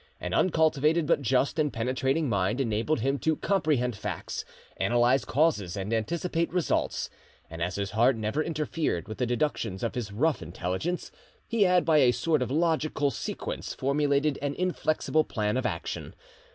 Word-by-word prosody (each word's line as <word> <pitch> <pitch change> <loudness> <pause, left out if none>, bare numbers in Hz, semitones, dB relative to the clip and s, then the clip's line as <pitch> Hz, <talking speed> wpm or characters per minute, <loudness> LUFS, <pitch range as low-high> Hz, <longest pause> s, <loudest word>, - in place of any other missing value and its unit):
An - - -4
uncultivated 160 -2 +3
but 145 - +2
just 130 +4 +1
and 150 -2 +2
penetrating 130 +6 0
mind 100 +1 0
enabled 115 +3 0
him 135 +3 0
to 160 -1 +1
comprehend 150 - +1
facts, - - -4 0.4
analyse 120 +2 +3
causes, 125 - +1
and 100 +3 -3
anticipate 165 +8 -1
results; 180 -1 0 0.4
and 80 0 -7
as 90 +2 -1
his 100 -1 -3
heart 120 +4 +4
never 110 +7 -1
interfered 155 - -2
with 110 - -7
the 125 - +1
deductions 120 -6 -1
of 115 - -1
his 115 -4 -4
rough 145 +9 +1
intelligence, 90 - -3 0.4
he 225 -3 +3
had 180 -1 +3
by 155 -2 +5
a 125 -3 +5
sort 150 +4 +1
of 125 - -1
logical 155 -2 +1
sequence - - -5
formulated 140 +1 +1
an 145 0 -2
inflexible 155 -3 +1
plan 105 -6 -1
of 130 -1 +1
action. - - -5
135 Hz, 160 wpm, -28 LUFS, 115-155 Hz, 0.4 s, by